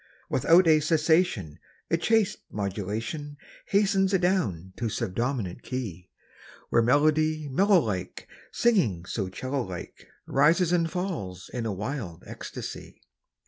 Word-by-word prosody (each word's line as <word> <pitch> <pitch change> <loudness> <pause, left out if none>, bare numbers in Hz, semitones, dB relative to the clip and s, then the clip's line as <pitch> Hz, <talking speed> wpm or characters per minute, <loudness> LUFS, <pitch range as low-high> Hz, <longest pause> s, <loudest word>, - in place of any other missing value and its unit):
Without 165 +7 +5
a 155 -1 +6
cessation 155 - +1 0.3
A - - +5
chaste 220 +3 +2
modulation 110 - -4 0.3
Hastens 195 -1 +3
adown 115 - 0
to 115 -2 -1
subdominant 115 -1 -2
key, 100 -9 -5 0.6
Where 115 - +4
melody 155 +4 +2
mellow 190 +8 +4
like 95 - -4 0.2
Singing 145 - +2
so 95 -1 -3
'cello 130 +8 -3
like 95 -6 -8 0.2
Rises 160 +5 +3
and 170 -2 +2
falls 160 - -4
in 120 -2 -2
a - - -1
wild 100 - -5
ecstasy. - - -8
135 Hz, 115 wpm, -27 LUFS, 100-170 Hz, 0.6 s, a